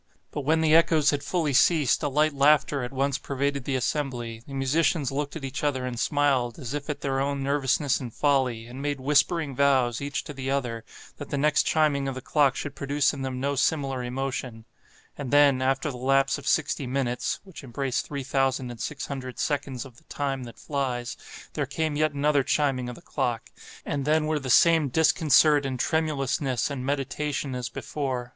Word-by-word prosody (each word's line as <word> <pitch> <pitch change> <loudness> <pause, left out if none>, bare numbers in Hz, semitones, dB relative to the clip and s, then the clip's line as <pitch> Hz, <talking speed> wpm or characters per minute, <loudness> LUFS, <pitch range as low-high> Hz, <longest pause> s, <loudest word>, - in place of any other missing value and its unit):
But 145 - -3
when 160 +4 +2
the 155 -1 +3
echoes 160 -2 +5
had 145 -1 -1
fully 155 -2 0
ceased, 150 0 +4
a 150 - 0
light 150 +2 +2
laughter 145 0 +3
at 125 0 -4
once 135 +1 0
pervaded 140 -1 -2
the 135 - -1
assembly; 125 -4 -2
the 135 - -7
musicians 140 +1 +1
looked 145 +2 -3
at 155 -4 -5
each 135 +2 -5
other 130 -3 0
and 120 -2 -4
smiled 135 -4 +1
as 130 -3 -6
if 145 0 -5
at 150 - -3
their 135 -1 -1
own 140 0 -1
nervousness 140 -1 +1
and 125 -3 -6
folly, 130 -5 +1
and 125 +3 -9
made 145 -1 -2
whispering 145 +2 +1
vows, 130 -4 +2
each 140 0 -3
to 150 - -8
the 135 -1 -5
other, 125 -5 -2 0.3
that - - -8
the - - -2
next 150 +2 +2
chiming 145 -3 +2
of 135 - -3
the 130 - -6
clock 145 0 +2
should 145 - -5
produce 140 0 0
in 140 - -6
them 130 -1 -3
no 140 +2 0
similar 135 -2 0
emotion; 125 -2 -4 0.5
and 140 -3 -4
then, 140 -2 +5
after 135 +3 0
the 125 - -8
lapse 135 +2 +2
of 140 - -10
sixty 140 -2 +1
minutes 125 -1 -1
(which 190 -6 -12
embrace 135 0 -2
three 140 -2 -6
thousand 135 -2 0
and 120 - -10
six 145 +4 -4
hundred 130 -2 -6
seconds 140 -4 -2
of 125 -3 -14
the - - -20
Time 135 -3 -3
that 120 - -11
flies), 130 -4 -3 0.4
there 145 -3 -2
came 155 +2 -2
yet 155 0 +2
another 145 0 +2
chiming 130 -3 0
of 125 - -7
the - - -15
clock, 115 -2 -3 0.3
and 140 -2 -2
then 155 +1 +2
were 155 0 0
the 135 -2 -6
same 160 +2 +5
disconcert 150 0 +4
and 130 -2 -3
tremulousness 140 -5 0
and 135 -3 -4
meditation 140 0 -2
as 125 -1 -4
before. 130 -4 -4
140 Hz, 200 wpm, -26 LUFS, 130-145 Hz, 0.5 s, echoes